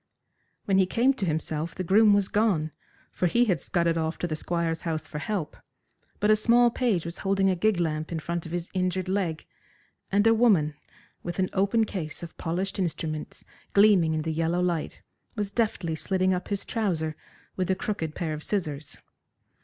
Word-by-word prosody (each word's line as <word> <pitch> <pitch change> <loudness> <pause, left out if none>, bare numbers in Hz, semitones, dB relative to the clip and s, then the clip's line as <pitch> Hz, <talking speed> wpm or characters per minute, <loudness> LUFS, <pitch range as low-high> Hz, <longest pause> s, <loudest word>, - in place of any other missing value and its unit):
When 195 -1 +3
he 190 - +4
came 245 +7 +3
to 210 -8 -3
himself 160 0 -2
the 185 - -3
groom 205 +4 +5
was 200 -1 +3
gone, 195 -8 +1 0.4
for 180 - 0
he 240 +8 +3
had 185 -7 +1
scudded 170 -2 0
off 160 +1 -2
to 175 - -2
the 155 - -2
Squire's 165 0 -2
house 160 -2 -3
for 150 - -5
help, 170 -3 -3 0.6
but 210 - +3
a - - +7
small 240 +2 +4
page 225 -10 0
was 170 +1 -6
holding 195 -1 +2
a - - +1
gig 205 +1 +1
lamp 155 -1 -1
in 165 - -2
front 170 +1 -4
of - - -9
his 175 0 -4
injured 185 0 -1
leg, 185 -5 -1 0.7
and 205 +2 +3
a 225 - +6
woman, 200 -10 +3 0.5
with 175 -1 -5
an 185 -1 0
open 200 +4 +2
case 170 -6 -5
of 170 - -8
polished 185 +5 -2
instruments 155 -4 -3 0.3
gleaming 195 -6 +5
in 155 - -1
the 160 0 -2
yellow 165 +2 0
light, 175 -3 -2 0.3
was 205 -2 -2
deftly 200 -8 0
slitting 185 +3 +1
up 180 - -3
his 200 -1 -3
trouser 165 -9 -1 0.4
with 185 -1 -1
a 190 - +3
crooked 175 -8 -3
pair 160 -3 -2
of 155 - -5
scissors. 155 -8 -3
180 Hz, 190 wpm, -27 LUFS, 160-200 Hz, 0.7 s, a